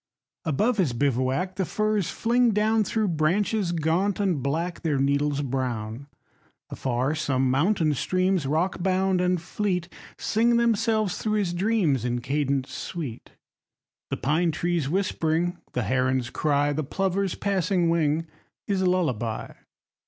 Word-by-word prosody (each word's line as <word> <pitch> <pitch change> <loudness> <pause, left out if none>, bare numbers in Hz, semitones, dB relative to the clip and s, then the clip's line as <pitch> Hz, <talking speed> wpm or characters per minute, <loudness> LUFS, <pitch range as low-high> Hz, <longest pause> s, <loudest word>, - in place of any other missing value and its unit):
Above 210 - +1
his 170 -11 +1
bivouac 135 +8 0
the 195 - +1
firs 215 0 0
fling 240 +1 +2
down 215 +1 +2
Through 215 0 0
branches 180 +5 +1
gaunt 175 +5 0
and 185 -8 +1
black, 165 +6 -2
their 155 -4 0
needles 140 +1 +1
brown. 125 -2 -3 0.6
Afar 130 +2 -1
some 135 -4 0
mountain 160 +2 +2
streams, 185 +1 0
rockbound 185 +4 +1
and 180 0 +1
fleet, 180 0 -2 0.3
Sing 235 +2 +2
themselves 220 -3 +1
through 215 - -1
his 190 -4 0
dreams 180 - +1
in 120 0 -1
cadence 135 +1 -1
sweet, 145 -10 -6 0.8
The - - -2
pine 160 +5 +1
trees 170 -2 -1
whispering, 175 -1 0
the 125 - 0
heron's 130 0 0
cry, 145 -1 +1
The 155 +2 -1
plover's 195 +5 -1
passing 190 -3 +1
wing, 160 -1 +1 0.4
his 195 -2 0
lullaby. 150 - 0
170 Hz, 130 wpm, -25 LUFS, 140-195 Hz, 0.8 s, fling